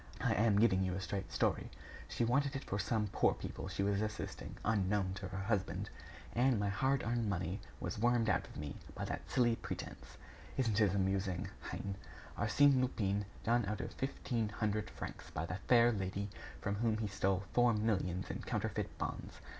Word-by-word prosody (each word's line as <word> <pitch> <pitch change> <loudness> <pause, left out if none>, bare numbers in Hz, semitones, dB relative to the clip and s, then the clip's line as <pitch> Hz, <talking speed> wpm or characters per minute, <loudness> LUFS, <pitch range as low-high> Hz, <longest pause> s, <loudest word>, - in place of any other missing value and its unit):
I - - +3
am 105 -1 +4
giving 105 -4 +5
you 90 -1 0
a - - -2
straight 95 0 -3
story. - - +1 0.4
She 120 - +1
wanted 140 +4 +2
it 135 - -3
for 100 - -2
some 105 0 +1
poor - - +3
people - - -5
she 100 - -1
was 100 0 +2
assisting 110 0 -4
unknown 100 -2 +2
to 95 0 -5
her 95 +1 -5
husband. 100 -2 -1 0.4
And 125 -1 +3
my 100 0 +1
hard 130 +7 +2
earned 115 -2 0
money 90 +1 -1 0.2
was 115 - -3
wormed 120 0 +3
out 95 - +2
of - - -11
me 75 -1 -5 0.2
by - - -3
that - - -4
silly 120 -2 +3
pretense! - - -7 0.4
Isn't 115 -4 +2
it 100 -2 +4
amusing, 95 -2 0 0.2
hein? 100 -1 -4 0.4
Arsène 130 +5 +5
Lupin 105 -5 0 0.2
done 120 +1 +3
out 105 +1 -2
of - - -4
fifteen 120 -4 -1
hundred 105 0 -1
francs - - -7
by 80 - -3
the 90 +3 -4
fair 120 -1 +7
lady 100 -1 -2 0.3
from 100 0 -1
whom 110 0 +2
he 110 -1 -1
stole 95 -1 +1
four 120 0 +5
millions 95 -4 0
in - - -4
counterfeit - - -2
bonds! - - -4
105 Hz, 185 wpm, -36 LUFS, 95-115 Hz, 0.4 s, fair